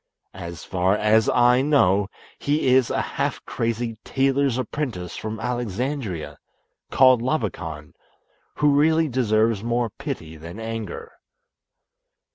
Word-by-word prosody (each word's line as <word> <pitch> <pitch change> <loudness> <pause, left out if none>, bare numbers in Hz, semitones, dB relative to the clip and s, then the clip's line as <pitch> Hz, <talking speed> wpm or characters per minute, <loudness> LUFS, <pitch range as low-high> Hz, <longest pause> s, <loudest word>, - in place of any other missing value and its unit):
As 85 -3 -8
far 95 +2 +1
as 110 +1 +3
I 125 +1 +4
know, 105 -9 +3 0.3
he 145 -1 +1
is 130 -2 +4
a - - 0
half - - -3
crazy 115 -1 -2
tailor's 135 -1 +1
apprentice 125 - -4
from 110 0 -5
Alexandria, 120 - -3 0.5
called 130 -3 +5
Labakan, 90 - -3 0.6
who 150 -1 +3
really 160 +2 +3
deserves 110 -4 +1
more 120 -1 0
pity 110 - -6
than 85 +7 -9
anger." 115 -3 -6
115 Hz, 110 wpm, -23 LUFS, 100-130 Hz, 0.6 s, called